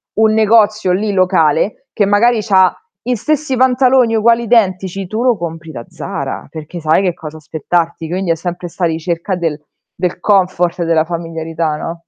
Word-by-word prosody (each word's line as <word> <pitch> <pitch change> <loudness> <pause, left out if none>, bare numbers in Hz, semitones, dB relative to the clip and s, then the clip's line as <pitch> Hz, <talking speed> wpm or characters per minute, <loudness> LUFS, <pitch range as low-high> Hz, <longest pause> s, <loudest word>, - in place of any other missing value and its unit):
un 220 0 +3
negozio 215 -2 +3
lì 205 +3 0
locale, 185 - +1
che 205 - +2
magari 215 +3 +3
c'ha 190 -3 +3 0.3
gli 250 0 -1
stessi 300 +3 -1
pantaloni 255 -2 +3
uguali 230 +2 +3
identici, 195 -4 +1
tu 215 +5 -3
lo 245 -4 +2
compri 165 -1 -6
da 120 -5 -8
Zara, - - -6
perché 155 +3 -8
sai 155 +4 +3
che 185 -3 0
cosa 155 -1 -9
aspettarti, 165 +2 -2
quindi 180 -1 -1
è - - +2
sempre 175 +1 -5
'sta 175 +1 -2
ricerca 170 +3 -2
del 165 -4 -2 0.4
del 180 0 -2
comfort 180 -3 +1
e 170 - 0
della 165 -1 +2
familiarità, 165 -2 -3
no? 165 +2 -6
185 Hz, 170 wpm, -15 LUFS, 165-215 Hz, 0.4 s, un